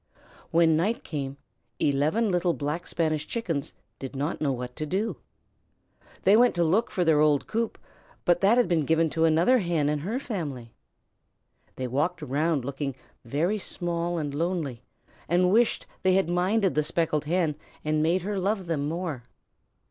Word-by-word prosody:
When 165 -1 +4
night 200 +9 0
came, 140 -3 -4 0.4
eleven 155 +10 +2
little 175 -1 +1
Black 150 +4 -3
Spanish 155 -2 -1
Chickens 170 -12 -3 0.3
did 135 +1 -7
not 145 +4 -2
know 145 -3 +1
what 125 -1 -5
to 155 - -3
do. 200 +8 -1 1.1
They 195 +2 +6
went 245 +2 +5
to 175 - +2
look 190 +8 +2
for 180 -4 0
their 160 -2 +4
old 150 -2 +3
coop, 230 +1 -2 0.5
but 175 0 +3
that 205 +5 +5
had 245 - +4
been 170 -3 +2
given 160 +1 +2
to 165 0 +2
another 170 +11 +4
Hen 170 -6 0
and 150 -1 -1
her 210 - -2
family. 145 - -5 1.0
They 130 - -4
walked 150 +7 -1
around 150 0 0
looking 140 -1 -3 0.3
very 165 - 0
small 175 -2 -2
and 145 -3 -3
lonely, 155 -6 -2 0.5
and 180 +2 +3
wished 230 +3 +2 0.2
they 185 0 +3
had 190 -3 +2
minded 190 +3 +2
the 150 - +2
Speckled 155 -2 0
Hen 165 -1 +1 0.3
and 155 0 +1
made 170 +3 +2
her 200 0 -2
love 195 0 -1
them 150 -4 -1
more. 165 -4 -3
165 Hz, 165 wpm, -27 LUFS, 150-185 Hz, 1.1 s, They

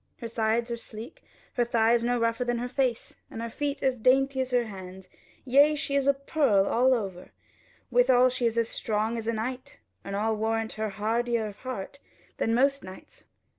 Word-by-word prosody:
Her 235 - -6
sides 230 +1 0
are 235 - -2
sleek, 230 +4 -10
and - - -31
her 240 -1 +1
thighs 230 +1 +3
no 245 +1 +1
rougher 230 +1 0
than 240 -1 -1
her 245 +1 -3
face, 250 -2 -2
and - - -8
her 230 0 -4
feet 290 +2 -3
as 260 -2 +1
dainty 265 +3 +3
as 260 - -2
her 245 -1 +2
hands: 190 -2 -10 0.4
yea, 285 +4 +5
she 285 -1 -3
is 280 -1 +1
a 280 - +6
pearl 275 -8 +2
all 255 +5 +3
over, 195 -6 -5 0.6
withal 245 +1 +5
she 250 -1 0
is 230 0 -2
as 230 -1 +2
strong 220 +1 -1
as 225 -1 -5
a 230 - +1
knight, 250 +4 -5 0.3
and 195 - -5
I 215 +2 0
warrant 220 +1 -1
her 220 0 -3
hardier 225 +3 -1
of 205 -1 -7
heart 255 +1 -6 0.4
than 225 - +1
most 275 +2 +2
knights. 185 0 -12
235 Hz, 200 wpm, -27 LUFS, 220-255 Hz, 0.6 s, a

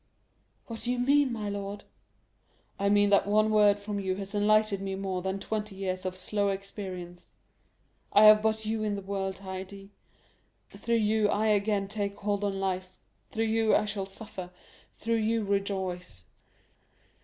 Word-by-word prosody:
"What 230 -1 -7
do 245 - -1
you 250 - -1
mean, 275 +2 +3
my 215 -3 -3
lord?" 200 0 -5 1.0
"I 200 0 +2
mean 205 0 +4
that 200 - +4
one 215 +1 +3
word 210 -1 +5
from 205 0 -4
you 190 -1 -1
has 195 +1 -7
enlightened 210 -1 +3
me 195 -1 -3
more 190 -1 -3
than 190 +1 -2
twenty 210 0 -4
years 185 -1 -3
of 185 - -4
slow 200 +2 -1
experience; 190 -3 -7 0.7
I 205 - +6
have 215 0 +9
but 220 0 0
you 220 0 -1
in 210 -1 -1
the 200 - -6
world, 195 -1 -3
Haydée; 195 +1 -7 0.8
through 235 - -1
you 215 -1 +2
I 215 +2 +1
again 205 -1 +1
take 200 -1 -3
hold 205 0 -1
on 195 -1 -1
life, 185 -1 -3 0.3
through 225 0 -1
you 220 0 +3
I - - +2
shall 200 -2 -3
suffer, 195 -2 -8 0.5
through 230 +1 0
you 225 0 +1
rejoice." 190 - -2
200 Hz, 165 wpm, -29 LUFS, 195-215 Hz, 1.0 s, have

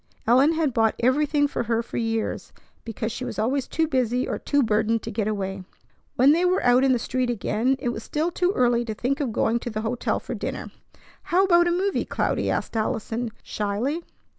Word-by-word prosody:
Ellen 260 +7 +5
had 315 -5 0
bought 225 -1 +2
everything 290 +4 +2
for 280 - -3
her 230 0 0
for - - -7
years, 225 -1 -2 0.3
because 225 0 -4
she 250 - -5
was - - -5
always 255 +5 0
too 325 -1 0
busy 250 -3 0
or - - -3
too 285 -1 +1
burdened 220 0 +1
to - - -5
get 210 0 -1
away. 195 -2 -3 0.5
When 265 +3 +6
they 335 +4 +3
were 365 +1 +2
out 245 +1 +5
in 270 - +4
the 250 - +3
street 250 +1 -1
again, 240 +3 0
it 245 - -2
was 230 -2 -4
still 310 +8 -2
too 360 +1 +1
early 240 -4 +2
to 220 -2 -4
think 275 +6 -1
of 275 -6 -1
going 225 +2 +1
to 240 - -5
the 215 -1 -3
hotel 230 +2 -1
for - - -6
dinner. - - -5 0.5
"How 365 +3 +3
about 345 -2 +4
a - - +2
movie, 380 +3 0
Cloudy?" - - -1
asked - - -2
Allison 225 +2 -2
shyly. 220 +10 -2
245 Hz, 210 wpm, -24 LUFS, 225-290 Hz, 0.5 s, When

